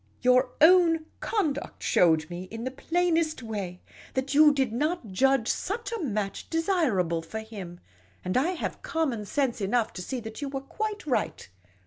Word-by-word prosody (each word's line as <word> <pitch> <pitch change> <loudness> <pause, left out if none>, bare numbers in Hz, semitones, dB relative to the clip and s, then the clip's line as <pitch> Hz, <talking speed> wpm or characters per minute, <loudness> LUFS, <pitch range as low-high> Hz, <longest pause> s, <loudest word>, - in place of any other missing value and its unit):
Your 250 +1 +4
own 330 -1 +6
conduct 315 -11 -2
showed 160 -3 +3
me 175 +2 -6
in 225 +4 -7
the 260 - -3
plainest 330 0 0
way 200 -5 -5 0.3
that 265 +1 -1
you 300 +1 +7
did 265 -5 0
not 300 - -1
judge 265 +3 +3
such 465 +5 -2
a 460 - -3
match 210 - -3
desirable 295 - +1
for 220 +7 -6
him; 195 -6 -9 0.5
and 185 - -2
I 305 +9 +2
have 355 - -4
conmion 265 -11 -2
sense 255 -1 0
enough 220 +3 +1
to 180 - -6
see 255 +8 -4
that 220 +4 -8
you 285 - -3
were 270 -1 -4
quite 430 +8 -4
right. 260 - -1
260 Hz, 165 wpm, -27 LUFS, 210-320 Hz, 0.5 s, you